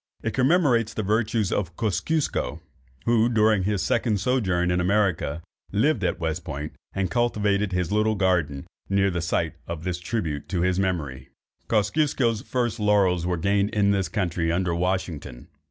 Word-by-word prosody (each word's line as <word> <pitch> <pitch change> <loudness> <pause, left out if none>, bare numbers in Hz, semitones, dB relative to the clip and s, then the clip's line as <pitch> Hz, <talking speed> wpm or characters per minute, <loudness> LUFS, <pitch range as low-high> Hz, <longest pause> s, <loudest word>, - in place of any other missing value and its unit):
It 115 - -2
commemorates 130 -5 +2
the 110 - -1
virtues 110 0 0
of 90 -4 -2
Kosciusko, 115 - -1 0.5
who, 115 0 +3
during 110 -4 +3
his 100 -3 0
second 110 -5 +1
sojourn 95 -7 +1
in 90 0 +1
America, 90 -5 0 0.3
lived 110 +2 +2
at 90 - 0
West 80 +1 -2
Point, 75 0 -5 0.2
and 95 -1 -1
cultivated 105 -4 +1
his 90 -2 -1
little 110 +1 +2
garden, 90 -8 0 0.2
near 100 0 +2
the 85 -1 -2
site 85 -1 -1
of 85 -1 -5
this 90 -1 -2
tribute 85 -7 -3
to 90 -3 -1
his 90 +1 +1
memory. 75 -9 -2 0.4
Kosciusko's 115 +1 +1
first 120 -3 -2
laurels 95 -5 +2
were 90 -1 0
gained 100 +4 +1
in 100 -1 +3
this 95 -2 0
country 85 -5 -1
under 85 0 0
Washington. 85 -8 -3
95 Hz, 155 wpm, -25 LUFS, 85-110 Hz, 0.5 s, who